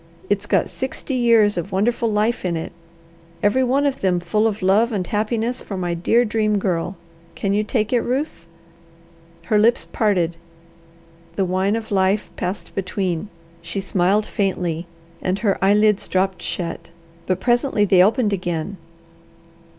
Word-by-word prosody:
It's 205 0 0
got - - +2
sixty 265 +1 -5
years 230 -6 +4
of 190 +4 -6
wonderful 230 +4 +1
life 215 +3 0
in 175 -3 -1
it, 160 - -5 0.7
every 210 +6 +3
one 270 +3 +2
of 275 -1 -1
them 185 -2 +2
full 210 +5 +1
of 210 -3 -3
love 210 +6 +3
and 195 -4 -1
happiness 220 +4 -1
for 195 - -6
my 175 -1 -1
dear 225 +8 +2
Dream 215 -1 +1
Girl. 180 -1 -1 0.4
Can 200 -1 -1
you 210 +1 +2
take 215 +1 -1
it, 240 - +3
Ruth?" 255 - -3 1.0
Her 215 -3 +2
lips 230 +3 +3
parted, 180 -6 0 1.0
the 195 - +1
wine 190 +3 +1
of 225 -1 -5
life 195 +1 +1
passed 180 +3 -4
between. 190 -1 -2 0.3
She 200 - -4
smiled 195 +2 +1
faintly, 180 -5 -2 0.3
and 185 +1 0
her 200 -3 0
eyelids 210 +1 +3
dropped 190 0 0
shut, 170 -1 -4 0.4
but 185 0 0
presently 240 -2 +2
they 185 -2 +5
opened 210 +2 +3
again. 175 0 -3
205 Hz, 150 wpm, -21 LUFS, 185-225 Hz, 1.0 s, they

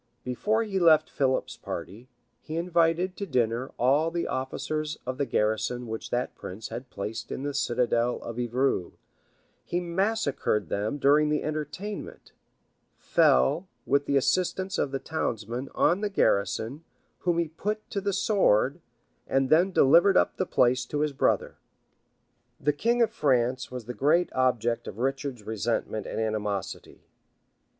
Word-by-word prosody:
Before 210 - 0
he 200 -3 -2
left 160 -3 +5
Philip's 130 -2 0
party, 100 +9 -7 0.3
he 155 - -7
invited 170 +1 +1
to 200 - -4
dinner 125 -2 0
all 140 +6 +3
the 170 0 -2
officers 150 +4 -3
of 130 +2 -4
the 140 - 0
garrison 110 +3 0
which 110 0 -6
that 120 +1 -1
prince 105 +4 -8
had 125 +1 -7
placed 110 +4 -5
in 135 - -4
the 145 0 -2
citadel 120 -3 +1
of 115 +1 -6
Evreux; 120 -5 0 0.7
he 175 - -2
massacred 175 - 0
them 105 +7 -1
during 145 +2 +4
the 150 0 0
entertainment; 155 +7 -5 0.7
fell, 150 - +3 0.2
with 140 0 +1
the 140 - +3
assistance 185 +6 0
of - - +1
the 135 - -2
townsmen, 120 -4 -3
on 180 +4 +3
the 210 - 0
garrison, 110 - 0 0.4
whom 175 -2 0
he 170 -1 +1
put 210 +7 -4
to 200 - -2
the 200 +1 0
sword; 185 - +2 0.5
and 135 -1 +1
then 175 +5 +5
delivered 175 +5 +5
up - - +2
the 185 - -1
place 125 +1 +3
to 145 +4 -3
his 150 -1 0
brother. - - 0 1.0
The 150 +1 +1
king 235 +10 +2
of 230 - 0
France 125 -2 +1
was 125 -3 -7
the 125 - -5
great 160 +7 +2
object 120 -2 +1
of 100 - -7
Richard's 135 -1 -2
resentment 110 -1 -2
and - - -4
animosity. 105 -3 -3
135 Hz, 150 wpm, -27 LUFS, 120-170 Hz, 1.0 s, left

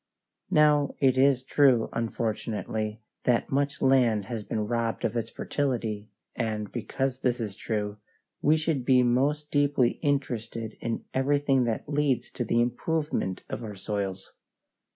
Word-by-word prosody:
Now 150 -2 +4
it 130 -2 +4
is 130 -1 +4
true, 130 -4 +4
unfortunately, 110 -1 -2 0.2
that 120 -2 +2
much 140 +1 0
land 120 -6 +4
has 110 0 -4
been 105 0 -2
robbed 115 0 -1
of 115 - -1
its 115 - -2
fertility, 115 -7 -2 0.3
and, 110 -3 -2
because 130 +2 -2
this 125 -2 0
is 105 -4 -4
true, 105 -2 -3 0.4
we 155 +2 +4
should 155 -4 -1
be 125 0 +5
most 145 +5 +1
deeply 145 -4 +2
interested 115 -6 -2
in 115 - -3
everything 135 -1 +2
that 115 -2 -2
leads 145 -3 0
to 125 - -3
the 115 +1 +2
improvement 125 - -1
of 120 - -5
our 105 -2 -6
soils. 95 -1 -4
120 Hz, 140 wpm, -27 LUFS, 110-140 Hz, 0.4 s, be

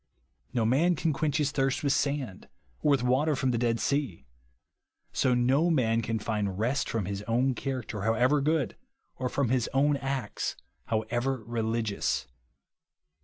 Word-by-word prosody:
No 115 -2 +1
ninn 155 +9 +3
can 160 0 +1
quench 150 0 0
his 150 -2 +1
thirst 135 -1 0
with 140 -1 +3
sand, 140 -9 -2 0.3
or - - +1
with 140 -4 +3
water 140 +5 +2
from 130 -1 +1
the 120 - 0
Dead 115 -1 +1
Sea; 135 - -1 0.9
so 125 -1 +2
no 135 +7 +3
man 115 -8 +2
can 115 0 -1
find 105 -3 -2
rest 125 +7 0
from 110 -4 -1
his 100 +1 -4
own 125 +3 +2
character 125 -6 -4
however 120 +7 +3
good, 155 -1 +1 0.4
or 130 -1 -2
from 140 -3 0
his 125 -2 +1
o^vn 140 0 +3
acts 135 -4 -2 0.3
however 120 +3 -1
religious. 115 -2 -1
125 Hz, 155 wpm, -29 LUFS, 115-140 Hz, 0.9 s, ninn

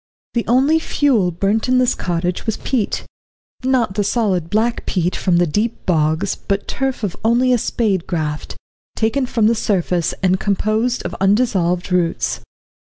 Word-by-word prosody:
The 235 - -1
only 270 +7 +4
fuel 260 - +1
burnt 200 +7 0
in 255 - +4
this 255 0 +3
cottage 175 +3 -2
was 220 - 0
peat 240 -6 -2 0.6
not 255 -6 +1
the 205 +1 0
solid 195 -6 0
black 225 +3 0
peat 180 -1 0
from 180 -3 +1
deep 205 +7 0
bogs, 160 +2 +1
but 200 0 -3
turf 265 -3 -2
of 195 -4 -2
only 245 +3 +3
a 245 - +2
spade 205 -6 -1
graft, 155 -3 -3 0.4
taken 250 +4 0
from 225 -3 +1
the 225 - +4
surface, 180 -6 0
and 185 0 +3
composed 215 +5 0
of - - -4
undissolved 195 -4 +1
roots. 175 -2 0
205 Hz, 155 wpm, -19 LUFS, 180-235 Hz, 0.6 s, only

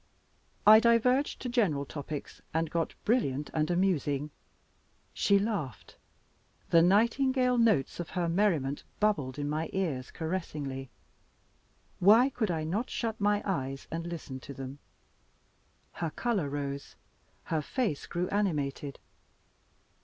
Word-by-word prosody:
I 215 +1 +10
diverged 240 +4 +3
to - - -2
general 190 - +1
topics, 145 +1 -7
and 165 -1 0
got 165 -1 -1
brilliant 150 - +1
and 155 -1 0
amusing. 150 -6 +1 0.8
She 200 - +3
laughed 195 - -3 0.8
the 165 - +7
nightingale 250 +6 +3
notes 215 - +2
of 175 - -4
her 175 -1 +1
merriment 165 -7 +1 0.2
bubbled 150 -12 +1
into 145 0 -2
my 155 +2 -2
ears 155 -10 -2
caressingly 150 -6 -4 1.1
why 225 +8 +6
could 220 -5 -1
I 160 -2 -1
not 200 +11 -2
shut 225 -2 -3
my 205 0 +2
eyes 135 -8 -3
and 165 +1 -3
listen 155 -6 -6
to 140 +2 -10
them? 135 +1 -7 1.1
Her 165 - -3
color 200 - -1
rose; 140 -1 -4 0.5
her 160 -2 -1
face 205 - -2
grew 175 +1 -2
animated. 150 -8 -1
170 Hz, 125 wpm, -30 LUFS, 145-210 Hz, 1.1 s, I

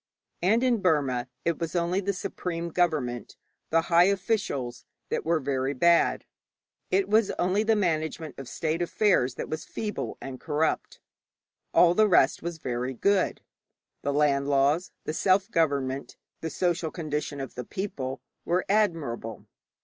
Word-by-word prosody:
And 220 +7 +3
in 240 -5 +2
Burma 140 -8 +1 0.2
it 170 -2 0
was 165 +1 -3
only 175 +2 +1
the 200 +1 0
supreme 170 -2 -4
government, 155 -9 -1 0.3
the 165 +1 +3
high 170 +1 +5
officials, 190 - -1 0.3
that - - -1
were 165 0 +2
very 135 0 -1
bad. 170 +5 +3 0.6
It 190 +1 +2
was 215 0 +3
only 185 +4 +2
the 220 0 +3
management 160 -6 -1
of 135 - -7
state 160 +1 -2
affairs 175 - +2
that - - -5
was 155 - -4
feeble 210 -1 -4
and 130 -1 -7
corrupt; 155 0 -1 0.7
all 175 -1 +6
the 215 +3 +4
rest 150 -6 +4
was 170 -1 -4
very 125 -2 -3
good. 200 +6 +1 0.6
The 145 - -1
land 140 -1 +2
laws, 145 +5 +2
the 155 - -3
self 190 +5 +2
government, 140 -4 0 0.2
the 160 - -4
social 170 +1 0
condition 150 -3 -4
of 135 -2 -6
the 125 - -5
people, 140 - -4 0.2
were 180 +2 0
admirable. 165 - 0
165 Hz, 150 wpm, -27 LUFS, 140-185 Hz, 0.7 s, all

